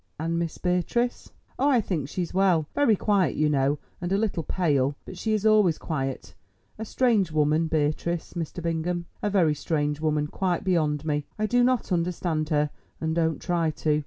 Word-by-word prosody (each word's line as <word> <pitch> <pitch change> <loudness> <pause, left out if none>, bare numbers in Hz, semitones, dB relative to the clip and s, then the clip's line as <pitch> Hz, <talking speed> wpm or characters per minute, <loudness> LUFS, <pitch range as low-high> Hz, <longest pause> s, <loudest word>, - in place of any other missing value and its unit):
"And 165 +1 -1
Miss 170 -1 -3
Beatrice?" 180 +7 -1 0.3
"Oh, 280 - +3
I 260 -4 +4
think 165 -10 -2
she's 175 0 -3
well—very 190 - +3
quiet, 200 -3 +1
you 150 0 +2
know, 140 +1 +2 0.2
and 175 +1 -3
a 195 - +3
little 205 -5 0
pale, 145 -5 +1
perhaps; - - -32
but 185 - -9
she 220 +2 0
is 215 0 0
always 210 -7 +4
quiet—a 100 - -6
strange 220 -7 +2
woman 155 +1 +2
Beatrice, 160 +2 -1
Mr. 170 0 -5
Bingham, 170 +1 -1 0.2
a 210 - 0
very 180 -6 +3
strange 150 0 -1
woman, 150 -1 +1
quite 175 +3 -1
beyond 155 -5 +1
me! 150 -2 -1
I 215 - 0
do 245 +3 +3
not 250 -4 +1
understand 170 -3 -1
her, 150 -2 +1 0.3
and 160 0 -1
don't 160 -2 0
try 170 -3 0
to. 150 -1 0
165 Hz, 180 wpm, -26 LUFS, 150-190 Hz, 0.3 s, I